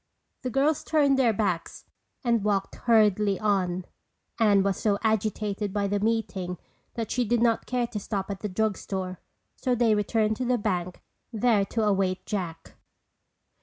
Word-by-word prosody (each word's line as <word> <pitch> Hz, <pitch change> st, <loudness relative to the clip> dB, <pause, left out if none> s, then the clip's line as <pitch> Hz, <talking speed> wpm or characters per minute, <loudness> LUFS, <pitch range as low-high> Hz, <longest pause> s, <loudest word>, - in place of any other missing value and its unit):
The 255 Hz, -, -3 dB
girls 280 Hz, +4 st, +1 dB
turned 285 Hz, -4 st, +3 dB
their 245 Hz, -3 st, +4 dB
backs 195 Hz, -6 st, -2 dB, 0.4 s
and 235 Hz, -4 st, +2 dB
walked 200 Hz, -2 st, 0 dB
hurriedly 210 Hz, -4 st, +3 dB
on. 185 Hz, -4 st, 0 dB, 0.5 s
Anne 205 Hz, -3 st, +4 dB
was 195 Hz, -1 st, 0 dB
so 205 Hz, -2 st, +1 dB
agitated 210 Hz, -2 st, 0 dB
by 205 Hz, 0 st, 0 dB
the 205 Hz, +1 st, 0 dB
meeting 200 Hz, -5 st, -1 dB, 0.4 s
that 225 Hz, -2 st, -3 dB
she 250 Hz, -, +1 dB
did 240 Hz, +1 st, +1 dB
not 230 Hz, -1 st, +2 dB
care 250 Hz, -1 st, 0 dB
to 220 Hz, -2 st, -5 dB
stop 200 Hz, -1 st, -3 dB
at 195 Hz, -, -5 dB
the 210 Hz, -, -4 dB
drug 210 Hz, +1 st, 0 dB
store 185 Hz, -2 st, -5 dB, 0.4 s
so 250 Hz, -1 st, 0 dB
they 230 Hz, -2 st, +3 dB
returned 215 Hz, +1 st, +1 dB
to 255 Hz, -, -2 dB
the 250 Hz, 0 st, +2 dB
bank 180 Hz, -5 st, -3 dB, 0.3 s
there 220 Hz, -3 st, +2 dB
to 225 Hz, +3 st, -1 dB
await 195 Hz, -3 st, +1 dB
Jack. 170 Hz, -5 st, -5 dB
210 Hz, 165 wpm, -27 LUFS, 195-230 Hz, 0.5 s, their